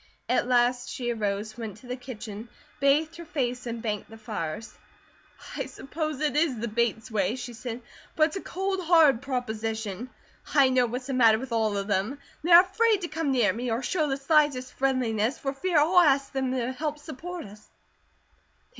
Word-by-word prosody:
At -, -, +1 dB
last 245 Hz, 0 st, +2 dB
she 240 Hz, -2 st, -3 dB
arose, 210 Hz, 0 st, -2 dB
went 220 Hz, -3 st, -6 dB
to 235 Hz, -, -17 dB
the 250 Hz, 0 st, -4 dB
kitchen, 230 Hz, -3 st, -8 dB, 0.3 s
bathed 300 Hz, +4 st, +2 dB
her 340 Hz, -, -8 dB
face, 250 Hz, -5 st, -2 dB
and 230 Hz, 0 st, -5 dB
banked 210 Hz, -3 st, -3 dB
the 225 Hz, -, -11 dB
fires. 215 Hz, -3 st, -5 dB, 0.8 s
"I -, -, -3 dB
suppose 305 Hz, 0 st, -4 dB
it 300 Hz, -2 st, 0 dB
is 300 Hz, -5 st, +2 dB
the 235 Hz, +2 st, -3 dB
Bates 230 Hz, +1 st, -1 dB
way," 205 Hz, 0 st, +1 dB
she 245 Hz, -1 st, -7 dB
said, 230 Hz, +1 st, -6 dB, 0.3 s
"but 310 Hz, -2 st, +4 dB
it's -, -, -9 dB
a 385 Hz, -, -3 dB
cold, 380 Hz, 0 st, -2 dB
hard 315 Hz, -8 st, +5 dB
proposition. 225 Hz, -3 st, -3 dB, 0.5 s
I 275 Hz, -3 st, +6 dB
know 255 Hz, -1 st, +3 dB
what's 250 Hz, +2 st, -5 dB
the 270 Hz, -, -3 dB
matter 230 Hz, -4 st, +5 dB
with 255 Hz, +2 st, -7 dB
all 220 Hz, -3 st, +1 dB
of 200 Hz, -, -2 dB
them. 205 Hz, +6 st, -1 dB, 0.3 s
They 345 Hz, -, 0 dB
are 345 Hz, +1 st, +10 dB
afraid 420 Hz, +2 st, +2 dB
to 345 Hz, -, -2 dB
come 325 Hz, -2 st, -2 dB
near 230 Hz, -7 st, +3 dB
me, 245 Hz, +2 st, -3 dB
or 230 Hz, +3 st, -1 dB
show 310 Hz, +2 st, 0 dB
the 270 Hz, -1 st, -1 dB
slightest 280 Hz, -3 st, +2 dB
friendliness, 250 Hz, -3 st, 0 dB
for 275 Hz, -1 st, -3 dB
fear 345 Hz, +4 st, 0 dB
I'll 330 Hz, +5 st, +5 dB
ask 275 Hz, -4 st, +3 dB
them 265 Hz, -1 st, -1 dB
to 250 Hz, -1 st, -1 dB
help 300 Hz, +3 st, -3 dB
support 320 Hz, +3 st, -7 dB
us. 210 Hz, +1 st, -14 dB
255 Hz, 190 wpm, -27 LUFS, 225-300 Hz, 0.8 s, are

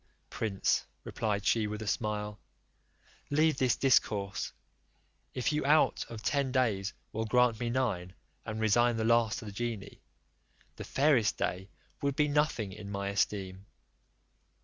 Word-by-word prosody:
"Prince," 100 Hz, -4 st, 0 dB, 0.2 s
replied 105 Hz, -2 st, -2 dB
she, 110 Hz, -2 st, +2 dB
with 105 Hz, +1 st, -5 dB
a -, -, -7 dB
smile, 105 Hz, 0 st, -2 dB, 0.9 s
"leave 155 Hz, 0 st, +3 dB
this 130 Hz, -2 st, +3 dB
discourse; 105 Hz, -7 st, +1 dB, 0.8 s
if 130 Hz, +4 st, 0 dB
you 150 Hz, -, 0 dB
out 150 Hz, +3 st, +3 dB
of 110 Hz, -2 st, -8 dB
ten 140 Hz, -2 st, +1 dB
days 105 Hz, -7 st, +1 dB, 0.2 s
will 110 Hz, +1 st, -1 dB
grant 125 Hz, 0 st, +3 dB
me 120 Hz, -1 st, -1 dB
nine, 105 Hz, -8 st, -1 dB, 0.3 s
and 110 Hz, -1 st, -5 dB
resign 115 Hz, +2 st, +3 dB
the 110 Hz, -, 0 dB
last 115 Hz, -2 st, +3 dB
to -, -, -7 dB
the 105 Hz, -, -6 dB
genie, 115 Hz, -1 st, -5 dB, 0.7 s
the -, -, -7 dB
fairest 135 Hz, -7 st, +2 dB
day 95 Hz, +2 st, -2 dB, 0.3 s
would 140 Hz, -1 st, 0 dB
be 150 Hz, +1 st, +3 dB
nothing 145 Hz, -8 st, 0 dB
in 100 Hz, +1 st, -9 dB
my 100 Hz, 0 st, -3 dB
esteem." 95 Hz, -1 st, -2 dB
110 Hz, 145 wpm, -31 LUFS, 100-130 Hz, 0.9 s, leave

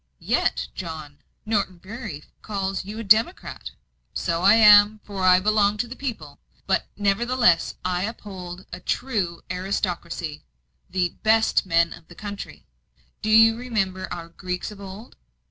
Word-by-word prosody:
"Yet, -, -, 0 dB
John, 155 Hz, -5 st, -7 dB, 0.3 s
Norton 200 Hz, -4 st, 0 dB
Bury 190 Hz, -, -8 dB, 0.2 s
calls 195 Hz, -2 st, -3 dB
you 205 Hz, +3 st, -7 dB
a 230 Hz, -, -4 dB
democrat." 220 Hz, -, +2 dB, 0.5 s
"So 170 Hz, -1 st, -1 dB
I 200 Hz, +4 st, +7 dB
am, 210 Hz, -1 st, +7 dB
for 195 Hz, -2 st, -5 dB
I 185 Hz, 0 st, +6 dB
belong 210 Hz, +1 st, +2 dB
to 240 Hz, -, -1 dB
the 250 Hz, -, -8 dB
people. 185 Hz, -, -6 dB, 0.3 s
But 195 Hz, -, +2 dB
I -, -, -28 dB, 0.2 s
nevertheless 215 Hz, -2 st, +2 dB
uphold 185 Hz, -1 st, -4 dB
a 180 Hz, -, -5 dB
true 195 Hz, -8 st, -2 dB
aristocracy 175 Hz, -4 st, -3 dB, 0.5 s
the 180 Hz, -1 st, 0 dB
BEST 220 Hz, -2 st, +3 dB
MEN 170 Hz, -1 st, +3 dB
of 165 Hz, -, -15 dB
the 175 Hz, -, -14 dB
country, 205 Hz, +1 st, -8 dB, 0.6 s
do 215 Hz, -, -2 dB
you 225 Hz, +1 st, +7 dB
remember 195 Hz, -6 st, -2 dB
our 170 Hz, -1 st, -6 dB
Greeks 180 Hz, +3 st, -5 dB
of 205 Hz, -1 st, -11 dB
old? 200 Hz, +4 st, -10 dB
195 Hz, 145 wpm, -24 LUFS, 180-215 Hz, 0.6 s, I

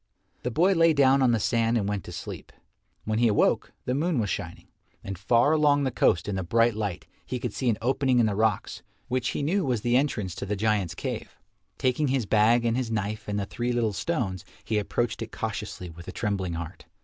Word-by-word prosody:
The 125 Hz, -, -2 dB
boy 175 Hz, +10 st, +3 dB
lay 165 Hz, -2 st, +5 dB
down 135 Hz, -1 st, +4 dB
on 130 Hz, -, +4 dB
the 115 Hz, -2 st, +2 dB
sand 115 Hz, +2 st, +1 dB
and 100 Hz, -3 st, -1 dB
went 100 Hz, -3 st, -2 dB
to -, -, -8 dB
sleep. 85 Hz, -, -7 dB, 0.5 s
When 110 Hz, 0 st, 0 dB
he 120 Hz, -, +4 dB
awoke, 105 Hz, -, +2 dB
the 125 Hz, -, 0 dB
moon 160 Hz, +3 st, 0 dB
was 105 Hz, -4 st, 0 dB
shining, 80 Hz, 0 st, -5 dB, 0.4 s
and 95 Hz, -, -5 dB
far 115 Hz, -, +3 dB
along 150 Hz, -2 st, +3 dB
the 130 Hz, -, 0 dB
coast 90 Hz, -6 st, +2 dB
in 105 Hz, -, -2 dB
the 95 Hz, -, -1 dB
bright 115 Hz, +6 st, +2 dB
light 100 Hz, -7 st, -3 dB, 0.2 s
he 130 Hz, -, -4 dB
could 120 Hz, -3 st, -4 dB
see 130 Hz, -, 0 dB
an 110 Hz, -, +1 dB
opening 130 Hz, 0 st, +2 dB
in 120 Hz, -, +5 dB
the 105 Hz, -, +1 dB
rocks 110 Hz, -1 st, 0 dB, 0.3 s
which 125 Hz, -1 st, 0 dB
he -, -, -2 dB
knew 185 Hz, +7 st, +1 dB
was 125 Hz, -7 st, 0 dB
the 120 Hz, +2 st, +1 dB
entrance 120 Hz, -, 0 dB
to -, -, -4 dB
the 105 Hz, -, -1 dB
giants' 105 Hz, -3 st, 0 dB
cave. -, -, -5 dB, 0.4 s
Taking 130 Hz, +4 st, +1 dB
his 130 Hz, -3 st, 0 dB
bag 110 Hz, +3 st, +4 dB
and 115 Hz, 0 st, +2 dB
his 125 Hz, -2 st, -1 dB
knife 105 Hz, -1 st, -3 dB
and 105 Hz, 0 st, -1 dB
the 100 Hz, -, -2 dB
three 120 Hz, +4 st, -3 dB
little 115 Hz, -3 st, 0 dB
stones, 100 Hz, -, -2 dB, 0.2 s
he 110 Hz, -1 st, 0 dB
approached 120 Hz, +3 st, -2 dB
it -, -, -5 dB
cautiously 90 Hz, -, -5 dB
with 85 Hz, +1 st, -12 dB
a -, -, -5 dB
trembling 100 Hz, -5 st, -2 dB
heart. 85 Hz, +1 st, -7 dB
115 Hz, 225 wpm, -26 LUFS, 100-130 Hz, 0.5 s, lay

